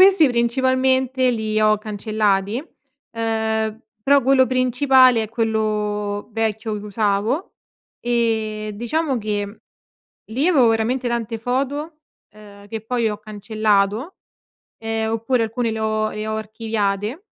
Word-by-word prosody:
questi 375 -6 +7
principalmente 260 +1 +2
li 215 -1 -1
ho 215 0 +4
cancellati, 210 -1 0 0.6
uhm, 220 -1 -1 0.2
però 280 +2 +4
quello 260 0 +4
principale 255 -2 +4
è - - -8
quello 210 -2 -1
vecchio 220 -1 -2
che 205 - -9
usavo. 210 - -1 0.5
Ehm, 220 -3 0
diciamo 255 +6 -1
che 205 -1 -3 0.7
lì 270 +8 0
avevo 270 -10 +5
veramente 240 +3 0
tante 230 -1 -2
foto, 280 +6 -2 0.4
uhm, 205 -1 -15
che 225 0 -4
poi 235 0 0
ho 210 - -5
cancellato, 215 - 0 0.6
ehm, 225 0 -2
oppure 230 +1 +1
alcune 230 +1 -2
le 220 - -3
ho 215 0 0
le 215 0 -5
ho 220 - -2
archiviate. 215 - -2
225 Hz, 120 wpm, -21 LUFS, 215-250 Hz, 0.7 s, questi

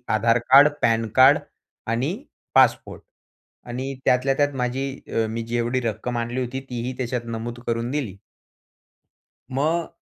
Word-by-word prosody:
आधार 115 +2 +3
card, 140 +2 +9
PAN card 115 +2 +4 0.5
आणि 120 +5 0 0.5
passport - - +3 0.7
आणि 130 +3 -4
त्यातल्या 130 +2 +3
त्यात 145 0 +1
माझी 130 +3 -2 0.3
अ, 115 - +1
मी 115 +1 -3
जेवढी 120 +2 -1
रक्कम 115 +2 -3
आणली 120 +2 -2
होती. 125 +1 -3
तीही 125 +1 -4
त्याच्यात 125 -1 -3
नमूद 120 +2 -6
करून 115 +1 -1
दिली. 130 -10 -3 1.3
मग, 160 +6 0
120 Hz, 125 wpm, -23 LUFS, 115-130 Hz, 1.3 s, card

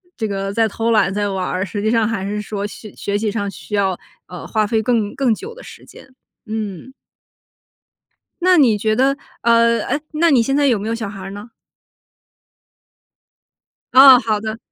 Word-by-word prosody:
这 225 - -3
个 195 -1 -3
在 225 0 +2
偷 230 +3 -1
懒 215 -3 +2
在 205 0 -1
玩 190 -2 -3
儿， 185 +1 -2
实 205 +2 -5
际 220 - 0
上 230 -2 +2
还 200 -4 -3
是 210 +1 -3
说 205 -1 -5
学 210 +1 -9
学 200 0 -2
习 215 0 -1
上 200 -2 -3
需 210 +3 -7
要， 190 -3 0 0.3
呃， 180 -1 -9
花 215 -1 0
费 220 +1 0
更 220 -3 0
更 260 -5 +1
久 455 - -9
的 - - -13
时 - - -13
间。 - - -15 0.4
嗯。 215 +2 -6 1.5
那 365 -1 +5
你 245 -7 +5
觉 215 +1 0
得， 270 +3 +2 0.3
呃 230 0 +3
哎， 290 +3 -2
那 325 +1 +2
你 255 - +5
现 270 +5 0
在 290 - +2
有 240 - +3
没 210 - -5
有 230 - -1
小 220 -3 -5
孩 200 -1 -9
儿 195 +1 -7
呢？ 205 +4 -10 2.4
哦， 265 -1 +9
好 215 -2 -1
的， 220 +1 -5
220 Hz, 205 characters per minute, -19 LUFS, 205-235 Hz, 2.4 s, 哦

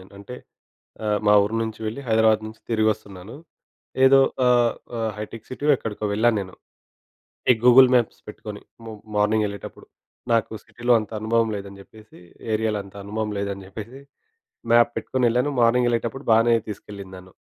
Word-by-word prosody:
నేను. 95 +2 -17
అంటే 125 +5 -9 0.7
ఆహ్, 105 -1 +1
మా 105 - +6
ఊరు 105 +2 -4
నుంచి 110 0 -6
వెళ్ళి 110 +6 -4
హైదరాబాదు 110 -1 +3
నుంచి 110 +1 -11
తిరిగి 110 -1 +2
వస్తున్నాను. 100 +1 -12 0.7
ఏదో 135 +1 +7 0.3
ఆహ్, 120 -2 +3 0.2
ఆహ్, 110 -1 -1
హైటెక్ 110 +1 -8
సిటీ 130 +3 -7
ఎక్కడికో 105 -2 -6
వెళ్ళాను 110 +2 +2
నేను. 95 -1 -8 1.0
ఈ - - +2
గూగుల్ 125 +1 +8
మ్యాప్స్ 120 -3 +1
పెట్టుకొని. 105 -1 -9 0.2
మ - - -11 0.3
మార్నింగ్ 105 +1 +2
వెళ్ళేటప్పుడు 100 -2 -9 0.5
నాకు 115 -1 +1
సిటీలో 120 +1 -1
అంత 110 - -9
అనుభవం 115 +1 +1
లేదని 100 0 -9
చెప్పేసి, 110 +2 -18 0.4
ఏరియాలో 110 -1 0
అంత 100 - -16
అనుభవం 105 +1 -3
లేదని 100 -1 -4
చెప్పేసి 115 +7 -9 0.7
మ్యాప్ 120 0 +5
పెట్టుకొని 130 -1 -1
వెళ్ళాను. 125 +4 +1
మార్నింగ్ 120 +1 +3
ఎళ్ళేటప్పుడు 120 +4 -3
బాగానే 115 +1 +4 0.2
తీసుకెళ్లింది 100 -2 -9
నను. 90 0 -14
110 Hz, 155 wpm, -23 LUFS, 105-120 Hz, 1.0 s, గూగుల్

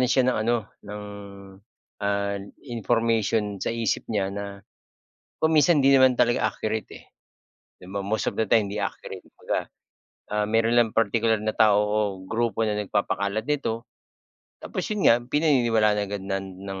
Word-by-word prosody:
na 125 - +2
siya 130 0 +3
ng - - -2
ano, 120 - +4 0.3
ng, 105 0 -6 1.0
ah, 100 0 -1 0.3
information 115 -4 0
sa - - -2
isip 115 -3 -1
niya 100 -3 -1
na 100 0 -7 0.8
kung 160 0 +3
minsan 150 +1 +5
hindi 135 0 +5
naman 130 -1 +6
talaga 120 -2 +3
accurate, 110 -1 -3
eh. - - -13 0.8
'Di 90 - -13
ba 100 0 -3
most 110 +2 -1
of - - -14
the 110 - +3
time 105 0 +3
hindi 100 - -5
accurate, - - -6
kumbaga. - - -3 0.6
Ah, 105 0 0
meron 115 +2 +2
lang 115 -2 +3
partikular 115 0 +2
na 110 - 0
tao 105 -2 +5
o 105 +1 0 0.3
grupo 115 -1 -1
na 105 -1 -1
nagpapakalat 100 +1 -1
nito. 120 -6 -1 0.8
Tapos - - -4
yun 210 -2 -1
nga, 115 - +6
pinaniniwalaan 120 -6 +2
agad 100 -1 -5
nan 95 -1 -4
ng, 95 -1 -6
110 Hz, 160 wpm, -25 LUFS, 100-120 Hz, 1.0 s, naman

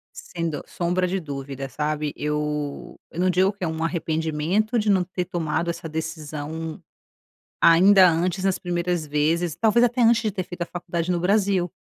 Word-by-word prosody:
Sem 170 -2 -4
do 150 - -5
sombra 180 +1 -1
de 190 +2 -1
dúvida, 135 -3 -6
sabe? 150 +1 -2
Eu 150 -1 -3
eu 170 - -4
não 185 +1 +3
digo 185 +2 +3
que 200 -2 -6
é - - 0
arrependimento 160 +5 -1
de 210 -1 +1
não 190 -2 +3
ter 180 0 -3
tomado 170 -1 -2
essa 170 -1 -6
decisão 160 0 -5 0.8
ainda 185 +3 +7
antes 180 +3 -1
nas 195 -1 +1
primeiras 175 -2 -2
vezes. 155 +3 0
Talvez 225 +5 +3
até 245 +1 +1
antes 230 0 +5
de 215 - 0
ter 190 -1 -2
feito 175 0 -10
a - - -2
faculdade 175 -1 -3
no 175 - +1
Brasil. 190 -1 +2
170 Hz, 170 wpm, -24 LUFS, 155-185 Hz, 0.8 s, ainda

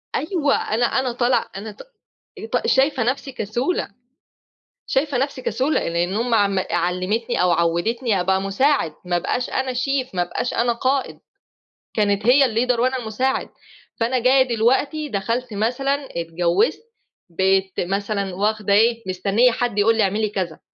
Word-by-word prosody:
أيوَه 310 -4 +1
أنا 235 +3 0
أنا 260 0 0
طالعة 245 +1 +1
أنا 215 +2 -6
ط - - -13 0.7
ط - - +1
شايفة 270 -2 +2
نفسي 270 +3 -2
كسولة. 245 - -2 1.0
شايفة 275 -1 0
نفسي 270 0 -2
كسولة 265 +4 0
لأن 175 +3 -1
أمي 230 +2 +1
عم 200 -3 +2
علمتني 185 +6 -1
أو 180 -1 +3
عودتني 185 +7 +1
أبقى 190 +1 +1
مساعد، 195 - +1
ما 175 0 -1
ابقاش 245 +8 -2
أنا 260 -1 -2
شيف 260 -2 -2
ما 180 - +1
ابقاش 205 +7 -2
أنا 235 0 +1
قائد، 260 +3 -1 0.8
كانت 205 -1 +1
هي 260 +4 +6
الleader 245 0 +1
وأنا 255 +2 +1
المساعد، 250 +3 -2 0.5
فأنا 240 +3 +1
جايّة 260 +2 +5
دلوقتي 280 +7 +1
دخلت 230 +4 -2
مثلًا 250 +7 0 0.2
اتجوزت 175 - 0 0.5
بَقيت 190 +2 +1
مثلًا 200 +1 -2
واخدة 210 0 0
إيه، 230 +2 +3
مستنية 200 +6 +2
حد 240 -2 -2
يقول 225 +2 +3
لي 220 - +3
اعملي 210 +2 0
كذا. 185 -6 -4
225 Hz, 145 wpm, -21 LUFS, 195-255 Hz, 1.0 s, هي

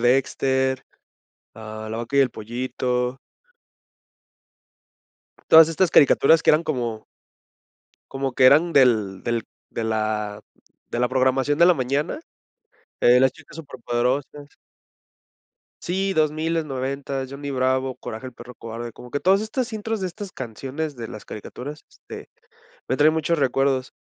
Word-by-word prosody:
Dexter, 130 +1 +1 0.7
ah, 110 0 -8
La 110 - -3
Vaca 120 +4 -2
y - - +6
el 130 -3 +1
Pollito. 125 +2 -3 2.3
Todas 160 0 +9
estas 170 +2 +1
caricaturas 155 +3 +5
que - - +6
eran 155 +2 +3
como. 120 -8 -3 1.1
Como 135 -1 -2
que 130 - +2
eran 155 +6 +6
del 110 - +3
del 120 -2 -2 0.3
de 115 - -4
la 110 -1 -2 0.5
de 120 - -3
la 125 0 +2
programación 130 +2 +1
de 170 - +7
la 180 - +6
mañana. 140 - -1 0.8
Eh, 125 +1 +6
Las 130 0 +4
Chicas - - -16
Súper 150 -3 -10
Poderosas. 130 +4 -2 1.3
Sí, 195 +2 -1
dosmiles, 155 +1 0
noventas, 135 0 -4
Johnny 140 +1 -6
Bravo, 130 0 0
Coraje 110 +4 -7
del 125 - -10
Perro 125 0 -12
Cobarde, 115 +1 -7
como 125 - -13
que 145 - -1
todas 190 +4 +3
estas 235 +2 -3
intros 220 -1 -3
de 185 - -1
estas 200 +2 -8
canciones 135 - -5
de 115 -3 -7
las 110 - -9
caricaturas, 140 +8 -9
este, - - -12 0.6
me 130 - 0
traen 155 +1 +5
muchos 160 0 0
recuerdos. 135 -1 0
130 Hz, 140 wpm, -23 LUFS, 120-155 Hz, 2.3 s, Todas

